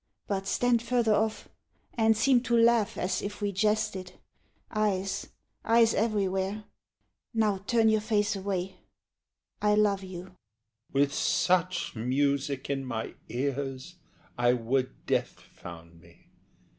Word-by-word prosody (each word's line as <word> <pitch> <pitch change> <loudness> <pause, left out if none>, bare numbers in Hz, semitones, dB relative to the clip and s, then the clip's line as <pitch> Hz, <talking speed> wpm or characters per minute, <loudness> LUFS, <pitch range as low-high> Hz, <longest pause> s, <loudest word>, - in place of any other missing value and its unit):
but 195 -1 -3
stand 245 +1 +2
further 235 -2 +2
off, 220 +1 0 0.5
And 225 -1 +3
seem 245 +2 +4
to 235 - +4
laugh, 230 -2 +3
as 185 - -1
if 205 0 -5
we 205 -1 -1
jested 210 -2 0 0.6
eyes, 200 -3 -1 0.4
Eyes 230 0 +4
everywhere! 200 -1 0 0.7
Now 210 -3 +2
turn 230 -2 +3
your 220 -1 +3
face 210 -1 +1
away... 190 -1 -3 0.8
I 210 0 +3
love 205 -2 +2
you. 185 -1 -7
HE. 185 - -16 0.6
With 140 +1 +2
such 180 +1 +1
music 140 +3 0
in 140 -1 -2
my 115 -4 -4 0.2
ears 135 +5 -3 0.4
I 120 0 +4
would 125 +2 -2
death - - -1
found 85 -1 -13
me. 85 -1 -22
195 Hz, 125 wpm, -28 LUFS, 140-215 Hz, 0.8 s, seem